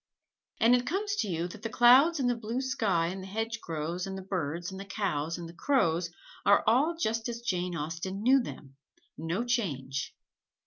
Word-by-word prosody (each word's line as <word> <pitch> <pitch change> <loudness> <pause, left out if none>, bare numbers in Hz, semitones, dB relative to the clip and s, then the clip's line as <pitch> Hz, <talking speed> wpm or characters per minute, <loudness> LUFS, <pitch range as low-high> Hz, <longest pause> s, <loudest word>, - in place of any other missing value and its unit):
And 230 +2 +5
it 250 0 +2
comes 405 +4 -1
to 215 - 0
you 170 -2 -2
that 210 +4 -11
the 225 - -3
clouds 265 +8 +6
and 255 - +1
the 245 - +2
blue 230 +2 -3
sky 225 -11 +1
and 190 +1 -5
the 190 - -8
hedgerows 185 -6 -3
and 190 0 -5
the 190 - -7
birds 175 -2 -3
and 190 - -7
the 195 - -7
cows 170 -6 -2
and 170 -1 -7
the 165 - -11
crows 170 - +1 0.3
are 200 - +5
all 270 +10 +3
just 225 -4 -1
as 235 0 -5
Jane 180 -5 -2
Austen 165 +6 -4
knew 265 +3 +5
them 135 - -9 0.4
no 170 +8 -2
change. 140 - -2
195 Hz, 190 wpm, -29 LUFS, 170-240 Hz, 0.4 s, clouds